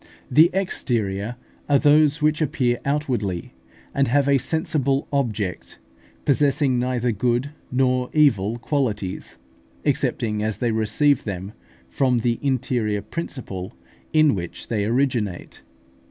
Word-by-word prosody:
The 155 Hz, +6 st, +7 dB
exterior 115 Hz, -, -1 dB, 0.3 s
are 140 Hz, -, +5 dB
those 150 Hz, +1 st, +4 dB
which 155 Hz, +1 st, +2 dB
appear 125 Hz, -5 st, +1 dB
outwardly, 125 Hz, -, -2 dB, 0.4 s
and 140 Hz, -1 st, +2 dB
have 140 Hz, +3 st, +2 dB
a 140 Hz, -1 st, +4 dB
sensible 140 Hz, -3 st, 0 dB
object, 110 Hz, -, -2 dB, 0.5 s
possessing 140 Hz, -2 st, +2 dB
neither 125 Hz, -1 st, 0 dB
good 120 Hz, +5 st, 0 dB, 0.2 s
nor 125 Hz, 0 st, +1 dB
evil 115 Hz, -8 st, +3 dB
qualities, 115 Hz, -8 st, -2 dB, 0.5 s
excepting 105 Hz, -2 st, 0 dB
as 110 Hz, -1 st, -1 dB
they 120 Hz, -2 st, 0 dB
receive 110 Hz, +6 st, +2 dB
them 100 Hz, 0 st, -5 dB, 0.3 s
from 125 Hz, -, +1 dB
the 115 Hz, 0 st, 0 dB
interior 120 Hz, -6 st, 0 dB
principle 115 Hz, -, -6 dB, 0.4 s
in 155 Hz, -2 st, +4 dB
which 85 Hz, -4 st, -6 dB
they 105 Hz, -3 st, 0 dB
originate. 115 Hz, -6 st, -1 dB
125 Hz, 115 wpm, -23 LUFS, 110-140 Hz, 0.5 s, The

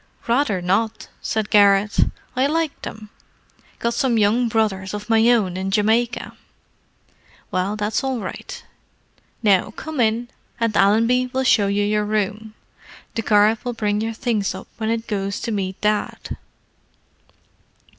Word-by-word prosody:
"Rather 235 Hz, -7 st, +1 dB
not!" 210 Hz, +5 st, 0 dB
said 215 Hz, -2 st, -2 dB
Garrett. 200 Hz, 0 st, +4 dB, 0.4 s
"I 260 Hz, +2 st, +2 dB
like 320 Hz, 0 st, -1 dB
them—got 220 Hz, +2 st, -8 dB
some 250 Hz, -3 st, +1 dB
young 220 Hz, +4 st, +3 dB
brothers 210 Hz, -4 st, -1 dB
of 210 Hz, +2 st, -5 dB
my 225 Hz, +1 st, +5 dB
own 210 Hz, -7 st, +2 dB
in 190 Hz, +1 st, -2 dB
Jamaica." 220 Hz, +4 st, +1 dB, 1.2 s
"Well, 185 Hz, +3 st, -1 dB
that's 215 Hz, +5 st, -1 dB
all 265 Hz, -2 st, -1 dB
right. 190 Hz, -, -7 dB, 0.8 s
Now 200 Hz, -2 st, +3 dB
come 310 Hz, +7 st, -7 dB
in, 235 Hz, +1 st, +1 dB, 0.3 s
and 230 Hz, -2 st, 0 dB
Allenby 230 Hz, +5 st, +3 dB
will 265 Hz, 0 st, 0 dB
show 210 Hz, -5 st, +4 dB
you 200 Hz, +1 st, +1 dB
your 210 Hz, +1 st, +1 dB
room. 215 Hz, +1 st, -2 dB, 0.6 s
The 225 Hz, -, -2 dB
car 210 Hz, 0 st, +4 dB
will 245 Hz, -1 st, -3 dB
bring 210 Hz, -2 st, -1 dB
your 225 Hz, +1 st, -2 dB
things 220 Hz, -5 st, -1 dB
up 190 Hz, -, -9 dB
when 220 Hz, -1 st, -2 dB
it 225 Hz, 0 st, -1 dB
goes 200 Hz, -2 st, -2 dB
to 230 Hz, -, -3 dB
meet 190 Hz, -3 st, -3 dB
Dad." 210 Hz, 0 st, -1 dB
215 Hz, 140 wpm, -21 LUFS, 205-235 Hz, 1.2 s, my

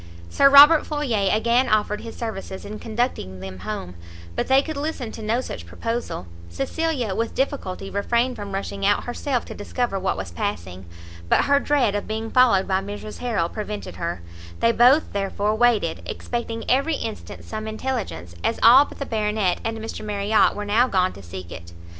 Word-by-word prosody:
Sir 275 Hz, -, +6 dB
Robert 290 Hz, +3 st, +9 dB
Floyer 245 Hz, -10 st, 0 dB
again 235 Hz, +4 st, +2 dB
offered 210 Hz, -1 st, +1 dB
his 230 Hz, -, -8 dB
services 195 Hz, -4 st, -6 dB
in 210 Hz, +1 st, -7 dB
conducting 220 Hz, -, -2 dB
them 95 Hz, 0 st, -8 dB
home; 95 Hz, -3 st, -5 dB, 0.4 s
but -, -, -1 dB
they 265 Hz, +1 st, +4 dB
could 315 Hz, +1 st, -5 dB
listen 280 Hz, -5 st, -4 dB
to 225 Hz, -, -9 dB
no 225 Hz, +3 st, 0 dB
such 85 Hz, -, -7 dB
proposal; 230 Hz, -, -4 dB, 0.2 s
Cecilia, 245 Hz, -, -2 dB
with 230 Hz, +3 st, -2 dB
difficulty 230 Hz, -9 st, -2 dB
refrained 235 Hz, +5 st, 0 dB
from 205 Hz, -1 st, -7 dB
rushing 195 Hz, 0 st, -4 dB
out 205 Hz, +1 st, +3 dB
herself 245 Hz, +1 st, -2 dB
to -, -, -8 dB
discover 205 Hz, 0 st, -2 dB
what 190 Hz, -, -1 dB
was 95 Hz, -3 st, -5 dB
passing; 90 Hz, 0 st, -4 dB, 0.4 s
but -, -, +4 dB
her 280 Hz, 0 st, +4 dB
dread 275 Hz, -8 st, +2 dB
of 205 Hz, -, -3 dB
being 220 Hz, +1 st, -4 dB
followed 240 Hz, -7 st, +4 dB
by 190 Hz, 0 st, +1 dB
Mrs 205 Hz, +2 st, -7 dB
Harrel 225 Hz, -9 st, 0 dB
prevented 210 Hz, +2 st, -6 dB
her; 170 Hz, -, -4 dB, 0.4 s
they 230 Hz, -, +4 dB
both, 250 Hz, +6 st, +4 dB
therefore, 200 Hz, +1 st, -1 dB
waited, 220 Hz, -7 st, +2 dB
expecting 235 Hz, -1 st, -4 dB
every 275 Hz, +5 st, +2 dB
instant 220 Hz, -5 st, -6 dB
some 215 Hz, 0 st, -5 dB
intelligence, 220 Hz, -, -4 dB
as 230 Hz, -, 0 dB
all 255 Hz, +5 st, +8 dB
but -, -, -12 dB
the 280 Hz, -, -4 dB
Baronet 210 Hz, -5 st, 0 dB
and 225 Hz, 0 st, -2 dB
Mr 225 Hz, 0 st, -6 dB
Marriot 210 Hz, 0 st, +2 dB
were 210 Hz, -, -4 dB
now 225 Hz, +5 st, +3 dB
gone 185 Hz, -4 st, +1 dB
to 100 Hz, -, -12 dB
seek 90 Hz, -1 st, -9 dB
it. 85 Hz, +1 st, -10 dB
215 Hz, 180 wpm, -23 LUFS, 190-245 Hz, 0.4 s, Robert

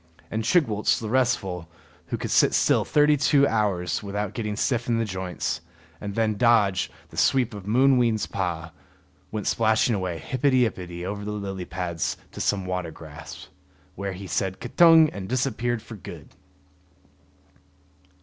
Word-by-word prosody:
And 110 Hz, +1 st, -2 dB
Chigwooltz 110 Hz, -, +2 dB
the 110 Hz, -, -5 dB
restful, 110 Hz, -9 st, 0 dB, 0.4 s
who -, -, -3 dB
could -, -, -4 dB
sit -, -, +4 dB
still -, -, +3 dB
thirty 150 Hz, 0 st, +4 dB
two 140 Hz, 0 st, +4 dB
hours 100 Hz, -6 st, 0 dB
without 105 Hz, 0 st, -3 dB
getting 105 Hz, -3 st, -3 dB
stiff 120 Hz, +2 st, 0 dB
in 120 Hz, -1 st, +1 dB
the 115 Hz, -, 0 dB
joints, 90 Hz, -4 st, -3 dB, 0.4 s
and 100 Hz, -1 st, -5 dB
then 110 Hz, -2 st, +1 dB
dodge 110 Hz, -6 st, +3 dB, 0.2 s
the -, -, -14 dB
sweep 125 Hz, -4 st, +2 dB
of 100 Hz, -2 st, -9 dB
Mooween's 120 Hz, -2 st, +3 dB
paw, 85 Hz, -4 st, -3 dB, 0.6 s
went 105 Hz, -2 st, -4 dB
splashing 110 Hz, +1 st, +2 dB
away 95 Hz, -4 st, -2 dB
hippety 130 Hz, -, +2 dB
ippety 90 Hz, -3 st, -7 dB
over 100 Hz, +2 st, -4 dB
the 105 Hz, -, -5 dB
lily 100 Hz, -3 st, -5 dB
pads 85 Hz, -1 st, -3 dB
to -, -, -7 dB
some 95 Hz, -2 st, 0 dB
water 90 Hz, -2 st, -3 dB
grass, 75 Hz, -2 st, -11 dB, 0.4 s
where 100 Hz, 0 st, -4 dB
he 95 Hz, +2 st, -8 dB
said 95 Hz, +1 st, -2 dB
K'tung! 160 Hz, +5 st, +6 dB
and 95 Hz, -2 st, -6 dB
disappeared 120 Hz, -2 st, -1 dB
for 110 Hz, -, -10 dB
good. -, -, -10 dB
105 Hz, 150 wpm, -25 LUFS, 95-120 Hz, 0.6 s, K'tung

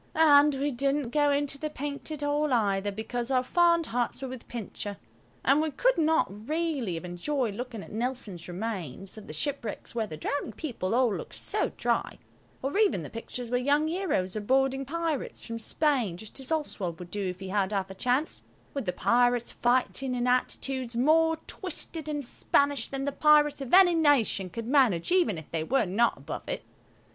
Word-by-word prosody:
And 295 Hz, -2 st, +6 dB
we 285 Hz, +2 st, -1 dB
didn't 275 Hz, 0 st, 0 dB
go 290 Hz, +1 st, +3 dB
into 280 Hz, 0 st, +1 dB
the 305 Hz, -, -3 dB
Painted 290 Hz, +1 st, -5 dB
Hall 290 Hz, 0 st, +1 dB
either, 205 Hz, -4 st, +1 dB
because 235 Hz, +4 st, -3 dB
our 255 Hz, -1 st, +2 dB
fond 340 Hz, +3 st, +3 dB
hearts 240 Hz, -2 st, -2 dB
were -, -, -2 dB
with 255 Hz, -2 st, -9 dB
Pincher, 205 Hz, -3 st, -6 dB, 0.5 s
and 280 Hz, +3 st, +5 dB
we 315 Hz, -, 0 dB
could -, -, +2 dB
not 320 Hz, 0 st, +3 dB, 0.2 s
really 305 Hz, -, -1 dB
have 165 Hz, -, -6 dB
enjoyed 225 Hz, +7 st, -2 dB
looking 235 Hz, -1 st, -6 dB
at -, -, -12 dB
Nelson's 220 Hz, -7 st, -3 dB
remains, 190 Hz, -, -5 dB
of 215 Hz, -2 st, -11 dB
the -, -, -7 dB
shipwrecks 235 Hz, -, -4 dB
where 225 Hz, -2 st, -1 dB
the 155 Hz, -, -7 dB
drowning 285 Hz, -, -3 dB
people 230 Hz, -, -3 dB
all 245 Hz, -5 st, +3 dB
look -, -, -7 dB
so -, -, -1 dB
dry, -, -, 0 dB, 0.5 s
or 280 Hz, +10 st, 0 dB
even 395 Hz, -, +3 dB
the -, -, -8 dB
pictures 235 Hz, +1 st, -6 dB
where 245 Hz, -, +2 dB
young 290 Hz, +4 st, +2 dB
heroes 315 Hz, -, -1 dB
are 215 Hz, -, -2 dB
boarding 270 Hz, +4 st, +1 dB
pirates 320 Hz, -1 st, -3 dB
from 230 Hz, -1 st, -5 dB
Spain 245 Hz, -, +1 dB
just 220 Hz, +7 st, -8 dB
as 265 Hz, +3 st, -5 dB
Oswald 205 Hz, -, -2 dB
would 175 Hz, 0 st, -10 dB
do 200 Hz, -1 st, -2 dB
if 180 Hz, 0 st, -5 dB
he 190 Hz, -1 st, -6 dB
had 200 Hz, 0 st, 0 dB
half 195 Hz, -2 st, -2 dB
a -, -, -6 dB
chance, 250 Hz, +9 st, 0 dB, 0.3 s
with 275 Hz, -7 st, -4 dB
the 180 Hz, -, 0 dB
pirates 245 Hz, +3 st, +2 dB
fighting 255 Hz, +1 st, +1 dB
in 245 Hz, 0 st, 0 dB
attitudes 250 Hz, 0 st, 0 dB
more 320 Hz, +6 st, +4 dB
twisted 330 Hz, -4 st, -5 dB
and 290 Hz, -2 st, -3 dB
Spanish 280 Hz, +3 st, +1 dB
than 275 Hz, 0 st, -4 dB
the 285 Hz, -, 0 dB
pirates 295 Hz, 0 st, +4 dB
of 265 Hz, -, -5 dB
any 365 Hz, -1 st, +7 dB
nation 285 Hz, -, +3 dB
could 230 Hz, +4 st, -6 dB
manage 250 Hz, -, +3 dB
even 350 Hz, -, +3 dB
if 160 Hz, -, -10 dB
they 160 Hz, -1 st, -1 dB
were 265 Hz, +10 st, +2 dB
not 210 Hz, +6 st, +2 dB
above -, -, -7 dB
it. -, -, -3 dB
255 Hz, 190 wpm, -28 LUFS, 215-295 Hz, 0.5 s, any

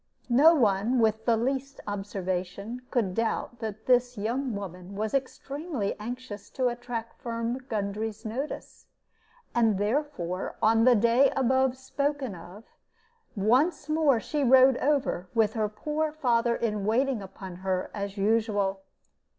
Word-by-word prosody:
No 295 Hz, +8 st, +7 dB
one 220 Hz, -1 st, +2 dB
with 220 Hz, -1 st, +2 dB
the 230 Hz, -2 st, +3 dB
least 270 Hz, +3 st, -2 dB
observation 200 Hz, +2 st, -4 dB
could 220 Hz, -8 st, 0 dB
doubt 230 Hz, +2 st, -2 dB
that 220 Hz, -1 st, -6 dB
this 250 Hz, -1 st, +3 dB
young 235 Hz, +3 st, -2 dB
woman 185 Hz, -1 st, -7 dB
was 215 Hz, +1 st, -2 dB
extremely 275 Hz, -, -3 dB
anxious 235 Hz, -2 st, -7 dB
to 255 Hz, -2 st, 0 dB
attract 240 Hz, -1 st, -6 dB
Firm 235 Hz, 0 st, -2 dB
Gundry's 215 Hz, +1 st, -3 dB
notice; 260 Hz, +7 st, -5 dB, 0.7 s
and 225 Hz, -4 st, +3 dB
therefore, 205 Hz, -, -2 dB
on 225 Hz, +1 st, +4 dB
the 250 Hz, -1 st, +7 dB
day 235 Hz, +5 st, +4 dB
above 265 Hz, 0 st, +2 dB
spoken 280 Hz, -2 st, -2 dB
of, 180 Hz, +5 st, -11 dB, 0.7 s
once 260 Hz, -, +2 dB
more 305 Hz, -5 st, +3 dB
she 295 Hz, +5 st, -2 dB
rode 260 Hz, 0 st, +6 dB
over, 265 Hz, -11 st, 0 dB
with 220 Hz, -2 st, +3 dB
her 215 Hz, -2 st, 0 dB
poor 300 Hz, +8 st, -2 dB
father 240 Hz, -6 st, +1 dB
in 210 Hz, -3 st, -1 dB
waiting 240 Hz, +3 st, +1 dB
upon 190 Hz, -1 st, -9 dB
her 185 Hz, 0 st, -2 dB
as 200 Hz, 0 st, -5 dB
usual. 205 Hz, -2 st, +1 dB
230 Hz, 135 wpm, -28 LUFS, 205-260 Hz, 0.7 s, No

